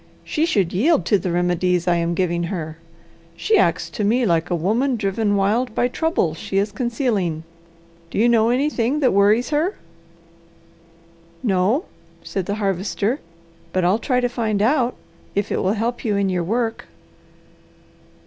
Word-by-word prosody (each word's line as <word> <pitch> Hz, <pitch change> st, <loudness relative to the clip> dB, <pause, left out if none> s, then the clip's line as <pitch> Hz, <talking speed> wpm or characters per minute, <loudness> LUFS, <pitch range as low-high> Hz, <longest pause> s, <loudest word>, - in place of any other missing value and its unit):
She 315 Hz, +2 st, 0 dB
should 195 Hz, -, +1 dB
yield 285 Hz, -, +2 dB
to 205 Hz, -, +3 dB
the 180 Hz, 0 st, -3 dB
remedies 175 Hz, 0 st, +1 dB
I 175 Hz, -1 st, +3 dB
am 170 Hz, 0 st, -1 dB
giving 175 Hz, -1 st, 0 dB
her. 160 Hz, -3 st, -5 dB, 0.6 s
She 435 Hz, -, +1 dB
acts -, -, +2 dB
to 215 Hz, -, -3 dB
me 235 Hz, +5 st, +2 dB
like 165 Hz, -4 st, +1 dB
a 175 Hz, -, +1 dB
woman 225 Hz, -, +1 dB
driven 205 Hz, 0 st, 0 dB
wild 220 Hz, +5 st, +1 dB
by 245 Hz, -, +2 dB
trouble 250 Hz, -, 0 dB
she 195 Hz, +4 st, -4 dB
is 200 Hz, +1 st, +1 dB
concealing. 225 Hz, -, -1 dB, 0.7 s
Do -, -, -6 dB
you 225 Hz, +3 st, +4 dB
know 230 Hz, -1 st, +4 dB
anything 260 Hz, +1 st, +1 dB
that 260 Hz, -, +3 dB
worries 210 Hz, +6 st, +3 dB
her?" 315 Hz, +7 st, +1 dB, 1.7 s
"No," 210 Hz, -, +1 dB, 0.4 s
said 190 Hz, -3 st, -4 dB
the 205 Hz, -, -1 dB
Harvester, 205 Hz, -, -1 dB, 0.5 s
"but 185 Hz, -, +1 dB
I'll 190 Hz, +5 st, +3 dB
try 250 Hz, +1 st, +1 dB
to 245 Hz, -, +1 dB
find 225 Hz, -4 st, -1 dB
out 250 Hz, 0 st, +2 dB, 0.4 s
if 200 Hz, 0 st, -1 dB
it -, -, 0 dB
will 190 Hz, +2 st, +1 dB
help 230 Hz, +3 st, -2 dB
you 210 Hz, -3 st, 0 dB
in 200 Hz, -1 st, +1 dB
your 180 Hz, -2 st, 0 dB
work." 225 Hz, +4 st, -2 dB
210 Hz, 160 wpm, -21 LUFS, 185-245 Hz, 1.7 s, you